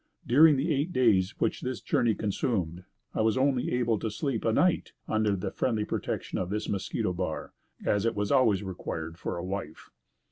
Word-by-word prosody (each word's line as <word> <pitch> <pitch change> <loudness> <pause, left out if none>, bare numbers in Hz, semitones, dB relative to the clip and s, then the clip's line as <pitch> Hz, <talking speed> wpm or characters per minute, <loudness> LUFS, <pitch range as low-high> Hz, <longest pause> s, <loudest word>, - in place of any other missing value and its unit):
During 150 +5 +7
the 155 +5 +1
eight 145 +5 0
days 110 - +3
which 115 - 0
this 130 0 -3
journey 115 -3 +1
consumed, 95 -5 -2 0.3
I - - 0
was 110 +1 +2
only 130 -1 +1
able 120 -3 +1
once - - -17
to 110 - -1
sleep 115 +2 -2
a 115 - +2
night 180 +10 +2
under 110 -2 +1
the 90 - -3
friendly 110 -4 0
protection - - -3
of 90 - -2
this 105 +2 -2
mosquito 95 -2 -1
bar, 85 -3 -4 0.3
as 105 -1 +2
it 115 0 0
was 105 0 -1
always 115 -8 +4
required 85 -3 -5
for - - -3
a 85 - -4
wife. 95 -5 -6
110 Hz, 190 wpm, -28 LUFS, 95-125 Hz, 0.3 s, During